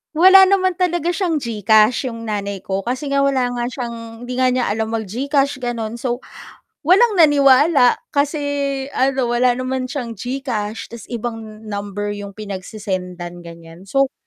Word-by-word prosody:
Wala 380 +4 +8
naman 375 -1 +3
talaga 350 -2 0
siyang 345 -6 0
GCash, 220 0 +3
yung 230 0 -8
nanay 200 -2 -3
ko. 195 +1 -3
Kasi 255 +4 -3
nga 275 0 +2
wala 265 -3 +2
nga 245 -1 -3
siyang 240 -2 -5 0.3
hindi 250 - -4
nga 255 0 +3
niya 250 -1 0
alam 220 +1 -2
mag-GCash 260 +5 -1
gano’n, 230 -2 -3
so 240 0 -3 0.7
walang 400 +7 +4
naniwala 285 -3 +5 0.2
kasi 290 +1 +1 0.5
ano, 260 -2 +1
wala 245 0 +3
naman 255 0 -3
siyang 250 -4 -4
GCash 230 -2 -4
tas 235 -3 -10
ibang 225 -2 -6
number 205 0 -4
yung 200 -1 -8
pinagse-sendan 185 -4 -6
ganiyan. 170 +2 -13
So 275 +4 +1
240 Hz, 145 wpm, -19 LUFS, 210-275 Hz, 0.7 s, Wala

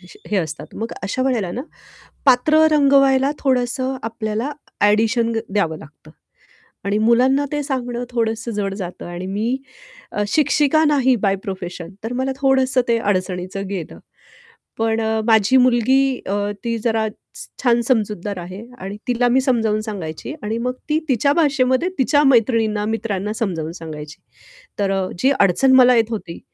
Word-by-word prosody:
विष 180 -1 -16
हे 210 - +1
असतात 160 -4 -4
मग 225 +2 -4
अशा 200 +7 -2
वेळेला 235 -9 0
ना 250 - -4 0.6
पात्र 265 +5 +5
रंगवायला 275 -2 +4
थोडंसं 260 0 0
आपल्याला 225 +3 -3 0.4
एडिशन 225 +2 +2 0.2
द्यावं 170 -6 0
लागतं. 155 +1 -15 0.8
आणि 200 +1 +1
मुलांना 250 +6 +3
ते 295 0 -1
सांगणं 245 -3 -3
थोडंसं 230 -1 -2
जड 200 -2 -2
जातं 180 -3 -7
आणि 175 +1 -6
मी 220 +6 -1 0.5
अ, 210 - -1
शिक्षिका 305 +2 +3
नाही 265 -4 +3
बाय 195 0 +3
प्रोफेशन, 180 -3 -6
तर 230 +2 -4
मला 260 +2 -1
थोडंसं 265 -1 +3
ते 230 -1 +3
अडचणीचं 185 -1 -2
गेलं. 185 -5 -6 0.8
पण 225 0 0
अ, 220 0 0
माझी 220 +3 +4
मुलगी 255 +1 +3
अ, 200 - -1 0.3
ती 230 0 -1
जरा 220 -1 0
छ - - -17 0.5
छान 240 -1 +3
समजूतदार 210 -5 -1
आहे 185 +5 -8 0.2
आणि 195 +2 -6
तिला 245 0 +2
मी 260 +2 +3
समजावून 225 -5 +1
सांगायची 200 - -6
आणि 220 +2 -2
मग 250 +1 -1 0.2
ती 305 - +2
तिच्या 280 +3 +2
भाषेमध्ये 285 0 +2
तिच्या 290 +3 +3
मैत्रिणींना, 225 -5 +2
मित्रांना 210 -2 -2
समजावून 170 -8 -3
सांगायची. 155 -3 -9 0.6
तर 195 -1 +1
अ, 190 -1 0
जी 265 - +3
अडचण 200 +8 +4
मला 250 -1 +7
येत 230 0 +2
होती, 185 -6 -5
225 Hz, 150 wpm, -20 LUFS, 200-260 Hz, 0.8 s, मला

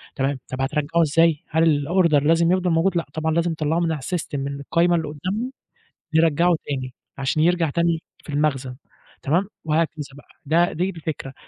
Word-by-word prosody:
تمام 135 0 -1
طب 130 +1 -4
هترجّعوا 150 +5 +1
إزاي؟ 165 0 +3
هل 155 -2 +2
الOrder 170 -5 +3
لازم 165 +2 +3
يفضل 185 -1 +1
موجود؟ 175 +2 +2
لأ، 170 - -1
طبعًا 160 0 -1
لازم 170 +1 +1
تطلّعه 155 +1 0
من 170 -1 +1
علي 155 -3 -3
الSystem، 175 +3 -4
من 140 +1 -4
القايمة 170 +5 +2
اللي 160 -2 -1
قدّامهم 185 - -3 0.6
يرّجعوا 165 +2 +3
تاني، 130 -3 -4 0.2
عشان 135 +3 0
يرجع 170 -1 +2
تاني 170 +1 0 0.2
في - - -18
المخزن، 140 -3 -1 0.5
تمام، 175 +8 +1 0.2
وهكذا 160 +1 +1 0.2
بقى، 145 - -16 0.2
ده 170 +4 +3
دي 180 +4 -1
الفكرة، 160 -6 -6
160 Hz, 175 wpm, -22 LUFS, 145-170 Hz, 0.6 s, إزاي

